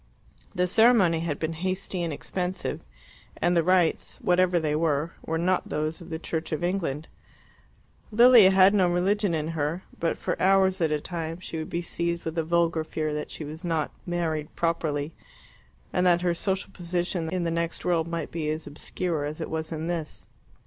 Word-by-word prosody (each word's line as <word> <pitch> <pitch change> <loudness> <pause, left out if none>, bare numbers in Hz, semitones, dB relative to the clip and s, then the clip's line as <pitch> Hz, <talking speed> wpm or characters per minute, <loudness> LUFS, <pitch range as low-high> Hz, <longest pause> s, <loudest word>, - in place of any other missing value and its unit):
The 180 - +2
ceremony 195 -4 +5
had 165 -3 -2
been 160 0 -2
hasty 185 +2 -3
and 170 -2 -1
expensive, 180 +5 -3 0.5
and 175 +1 +2
the 170 - +5
rites, 180 -1 +2
whatever 180 0 +3
they 150 -2 0
were, 155 0 0
were 160 - -2
not 180 +2 0
those 155 +3 -2
of 170 - -11
the 160 - -3
Church 160 0 -4
of 155 +2 -2
England. 165 -5 -1 1.0
Lilia 235 -2 +8
had 190 +1 +6
no 185 -4 +4
religion 190 +1 +1
in 155 0 -2
her; 165 +3 -2 0.2
but 165 - 0
for - - -3
hours 190 -1 +4
at 160 - +3
a 150 - +1
time 165 +1 -5
she 170 -2 -6
would 155 - -5
be 170 +1 -2
seized 170 0 -2
with 160 0 -3
a - - +1
vulgar 165 0 +1
fear 155 -1 -3
that 150 0 -4
she - - -6
was 155 +4 -8
not 165 -3 -1 0.2
"married 165 -3 -2
properly," 160 -3 -1 0.8
and 180 0 +2
that 175 -1 +4
her 175 -1 +1
social 190 +3 -2
position 175 -1 -2
in 180 +1 -1
the 165 - -1
next 170 0 -2
world 170 -2 +1
might 170 0 -4
be 160 -2 -2
as 155 +1 -3
obscure 155 +2 -3
as 150 +1 -4
it - - -5
was 160 0 -3
in 160 0 -3
this. 165 -3 -4
170 Hz, 190 wpm, -26 LUFS, 160-180 Hz, 1.0 s, Lilia